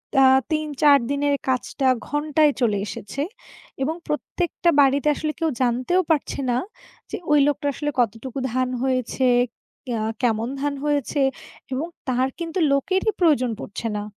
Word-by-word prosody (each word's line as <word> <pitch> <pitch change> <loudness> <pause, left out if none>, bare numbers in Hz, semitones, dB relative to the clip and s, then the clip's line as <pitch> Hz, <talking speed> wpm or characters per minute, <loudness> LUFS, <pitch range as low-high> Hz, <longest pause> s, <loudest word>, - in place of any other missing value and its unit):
তা 270 0 +6 0.3
৩-৪ 300 -2 +4
দিনের 285 0 +1
কাজটা, 260 +1 0 0.2
ঘণ্টায় 295 0 +2
চলে 210 -4 +2
এসেছে 205 +8 -5 0.6
এবং 315 +4 -1
প্রত্যেকটা 340 +3 -1
বাড়িতে 280 +2 +3
আসলে 310 +1 -2
কেউ 325 -1 +1
জানতেও 255 +9 +2
পারছে 295 -2 0
না, 240 - +2 0.5
যে - - -2
ওই 295 - +6
লোকটার 285 0 0
আসলে 295 +2 -2
কতটুকু 235 +3 -1 0.2
ধান 255 0 +1
হয়েছে, 260 0 0 0.7
এয়া 225 -2 -1 0.2
কেমন 225 -1 +1
ধান 290 0 0
হয়েছে 290 -1 0 0.5
এবং 295 +6 -2 0.2
তার 255 +1 +2
কিন্তু 335 +2 -3
লোকেরই 375 +9 +1
প্রয়োজন 285 -8 +3
পড়ছে 225 +3 -5
না। 205 - -3
280 Hz, 140 wpm, -23 LUFS, 255-300 Hz, 0.7 s, তা